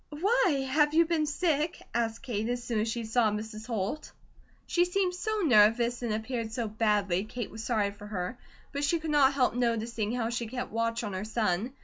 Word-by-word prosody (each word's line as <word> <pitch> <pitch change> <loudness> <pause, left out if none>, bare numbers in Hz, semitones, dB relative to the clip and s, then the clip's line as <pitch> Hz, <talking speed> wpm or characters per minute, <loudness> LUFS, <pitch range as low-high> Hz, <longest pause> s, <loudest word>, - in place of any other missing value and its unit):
"Why, 310 - +2
have 295 +3 +2
you 335 +1 +6
been 320 -2 0
sick?" 305 0 0
asked 230 0 -1
Kate 225 -3 -2
as 245 0 -2
soon 235 -2 -1
as 215 - 0
she 235 +1 -2
saw 220 0 +3
Mrs. 215 +1 -5
Holt. 225 +5 -3 0.5
She 350 - +2
seemed 360 +1 0
so 430 +4 -2
nervous 235 0 +4
and 235 -2 -2
appeared 220 +1 -3
so 230 0 -2
badly 210 -4 +1
Kate 230 +1 -6
was 220 +1 -7
sorry 215 -4 +1
for 205 +1 -11
her; 205 +3 -4 0.3
but 285 +1 -3
she 315 +4 +2
could 315 -1 -3
not 280 -2 +5
help 260 -2 +2
noticing 230 -2 -1
how 235 -2 -1
she 235 -1 -2
kept 250 +2 -5
watch 230 +1 -1
on 205 -3 -4
her 185 +2 -3
son. 215 +1 -1
235 Hz, 205 wpm, -29 LUFS, 220-285 Hz, 0.5 s, you